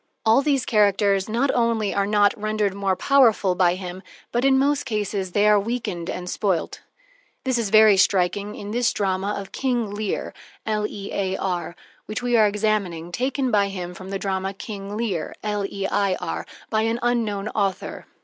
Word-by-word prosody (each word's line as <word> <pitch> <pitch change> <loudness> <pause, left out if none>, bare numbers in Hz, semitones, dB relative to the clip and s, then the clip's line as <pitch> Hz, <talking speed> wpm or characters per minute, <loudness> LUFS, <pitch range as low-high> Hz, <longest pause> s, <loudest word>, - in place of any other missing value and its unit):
All 225 +4 +5
these 275 -3 +1
characters 200 -2 +2
not 245 +5 +1
only 230 -4 +1
are 200 0 +1
not 205 -1 +3
rendered 215 -2 -1
more 195 -1 0
powerful 225 -4 +4
by 180 -1 +3
him, 185 0 -7 0.3
but, 240 +1 0
in 270 -1 +4
most 285 +1 +2
cases, 205 -6 -3
they 205 0 +3
are 210 -1 +6
weakened 200 -6 -3
and 180 0 -5
spoilt. 185 -2 -1 0.6
This 260 -3 0
is 220 -4 -1
very 215 -1 +7
striking 195 +2 +1
in 205 0 -7
this 240 +2 +2
drama 195 +1 -1
of 195 -1 -7
"King 240 -5 -1
Lear," 210 -1 -3 1.7
which 215 +3 -4
we 245 -1 +1
are 215 -2 +6
examining, 200 -5 -1
taken 260 +4 -1
by 200 -1 +3
him 180 -2 -5
from 185 +2 -10
the 195 - -2
drama 195 0 -2
"King 200 0 -6
Leir," 205 -8 -2
by 195 - -1 0.4
an 225 +1 0
unknown 220 -4 0
author. 195 -3 -2
205 Hz, 155 wpm, -23 LUFS, 195-230 Hz, 1.7 s, very